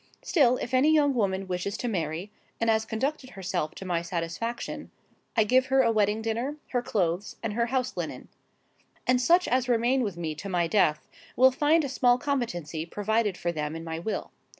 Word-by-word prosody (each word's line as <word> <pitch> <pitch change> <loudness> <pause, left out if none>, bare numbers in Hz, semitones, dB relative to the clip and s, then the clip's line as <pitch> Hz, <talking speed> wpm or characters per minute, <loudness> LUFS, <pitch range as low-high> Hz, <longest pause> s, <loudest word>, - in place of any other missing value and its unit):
Still, 255 -7 +3
if 245 - -5
any 260 +4 +5
young 295 -3 +4
woman 195 -5 0
wishes 185 +2 -3
to 245 - -3
marry, 175 -1 -3 0.3
and 230 0 +3
has 220 0 +1
conducted 260 +5 -2
herself 185 - -3
to 195 - -8
my 175 -2 0
satisfaction, 170 +7 -4 0.5
I 220 - +6
give 255 +5 +3
her 265 0 +4
a 230 - +3
wedding 215 0 +1
dinner, 235 +6 -2
her 245 - 0
clothes, 185 -4 -1
and 225 -2 -2
her 235 +2 +1
house 255 0 -1
linen. - - -5 0.8
And 250 0 +3
such 345 +8 +4
as 255 0 +1
remain 245 +3 +2
with 200 -7 -2
me 160 -2 -3
to 175 +6 -7
my 175 -2 +1
death, 165 -5 +2 0.3
will 260 +1 +6
find 305 +4 +3
a - - -1
small 250 -2 +3
competency 200 - -2
provided 210 +2 -1
for 175 - -1
them 150 -1 -3
in 165 - -6
my 165 0 -4
will. 210 +6 -4
220 Hz, 195 wpm, -27 LUFS, 175-255 Hz, 0.8 s, I